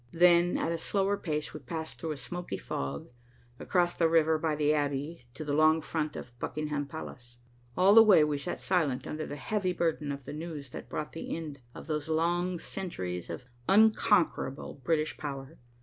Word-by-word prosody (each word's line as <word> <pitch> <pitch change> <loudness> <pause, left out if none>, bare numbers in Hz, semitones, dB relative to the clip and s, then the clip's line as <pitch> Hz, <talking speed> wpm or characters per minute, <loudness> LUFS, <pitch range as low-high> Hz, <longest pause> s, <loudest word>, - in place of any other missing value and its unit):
Then, 175 0 +5
at 165 - -1
a 165 - -2
slower 195 +3 +1
pace, 150 -6 -3
we 155 - -6
passed 160 +4 -6
through 160 -2 -2
a - - -9
smoky 175 +8 -5
fog, 70 - -5 0.5
across 175 -2 +1
the 165 -1 +2
river, 160 -1 +4
by 155 -1 0
the 150 0 +2
Abbey, 145 0 -2
to 155 - -6
the 145 - -1
long 155 +2 +5
front 155 -1 -3
of - - -7
Buckingham 150 0 -3
Palace. 120 -5 -9 0.4
All 190 +2 +6
the 225 - +10
way 200 -8 +7
we 150 -1 0
sat 175 +5 -4
silent 160 -9 0
under 155 0 -4
the 145 - -5
heavy 185 +6 -1
burden 160 -4 -1
of 140 -2 -6
the - - -6
news 150 -4 -6
that - - -8
brought 150 - -4
the 165 - -5
end 150 -4 -7 0.2
of - - -9
those 150 -1 -3
long 175 +3 +1
centuries 95 - -4
of 125 - -6 0.2
unconquerable 195 -10 +3
British 155 0 0
power. 140 +1 -6
155 Hz, 185 wpm, -30 LUFS, 145-175 Hz, 0.5 s, the